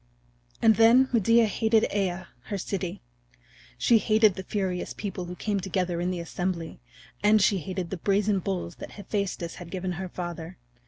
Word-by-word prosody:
And 220 -2 +6
then 240 +4 +6
Medea 230 +1 +5
hated 220 +1 +2
Aea, 185 -2 -1 0.2
her 205 - -3
city. 185 - -4 0.7
She 230 - +4
hated 215 -1 +4
the 190 - -6
furious 190 -2 -3
people 190 -3 -5
who 180 +1 -7
came 205 +1 -1
together 180 -2 -1
in 180 - 0
the 180 -1 -2
assembly, 170 0 -4 0.4
and 215 +1 +5
she 195 -1 +3
hated 180 +1 -5
the 190 - -3
brazen 200 +2 +1
bulls 180 -2 -4
that - - -9
Hephaestus 200 -4 -3
had 175 - -9
given 185 0 -3
her 185 +1 -5
father. 175 -2 -6
190 Hz, 165 wpm, -27 LUFS, 180-210 Hz, 0.7 s, And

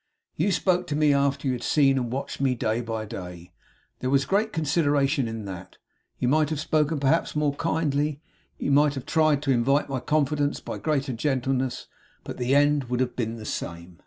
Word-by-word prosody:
You 185 +6 +1
spoke 180 -1 +1
to 150 - -2
me 150 -1 +4
after 140 0 +1
you 130 - +1
had 120 - -4
seen 135 0 +3
and 125 -3 -2
watched 135 +1 -4
me 130 -2 +2
day 115 0 -1
by 110 -2 -4
day. 90 -3 -9 0.5
There 130 - -2
was 135 0 +3
great 215 +3 +1
consideration 145 - +1
in 110 -2 -5
that. 90 -2 -9 0.4
You 125 - -1
might 150 +3 +3
have 155 -2 -2
spoken, 155 0 +1
perhaps, 145 +5 +1
more 150 -2 +1
kindly; 150 -2 -1 0.4
you - - -2
might 145 +1 +4
have 135 - -6
tried 155 -3 +2
to 140 - +1
invite 135 +4 +2
my 135 -1 -2
confidence 145 0 0
by - - -6
greater 140 -4 -1
gentleness; 130 0 -1 0.4
but - - -7
the 125 +2 +1
end 145 -1 +3
would 125 0 -2
have 130 -1 -1
been 115 -2 -2
the 110 -2 -9
same. 85 -1 -6
140 Hz, 195 wpm, -25 LUFS, 125-150 Hz, 0.5 s, me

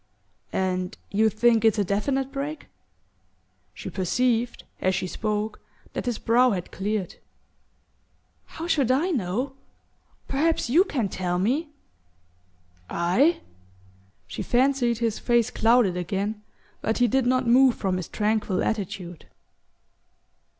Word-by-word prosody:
"And 185 -1 -1
you 220 +2 +3
think 230 +1 +3
it's 225 -1 +4
a 205 - +2
definite 265 +8 -1
break?" 290 +3 -5 1.1
She - - -7
perceived, 235 +5 0 0.2
as 185 0 +2
she 190 0 -1
spoke, 210 +2 -3 0.3
that - - -4
his 240 -3 0
brow 245 +2 +3
had 185 -6 -3
cleared. 205 -1 -3 1.3
"How 325 - -7
should 290 -7 +1
I 295 +9 +2
know? 250 - -1 0.7
Perhaps 295 -2 0
you 350 +8 +5
can 245 - -1
tell 180 -1 -2
me." 265 - 0 1.2
"I?" 210 - +2 0.8
She - - -6
fancied 245 -2 +2
his 230 -2 -1
face 240 -2 +2
clouded 225 -5 +3
again, 200 +4 -3 0.4
but 220 - -1
he 245 - +4
did 260 +2 +1
not 255 0 +2
move 250 +1 +5
from 190 -2 -1
his 185 - -5
tranquil 210 -3 0
attitude. 180 -5 -4
225 Hz, 120 wpm, -25 LUFS, 195-255 Hz, 1.3 s, you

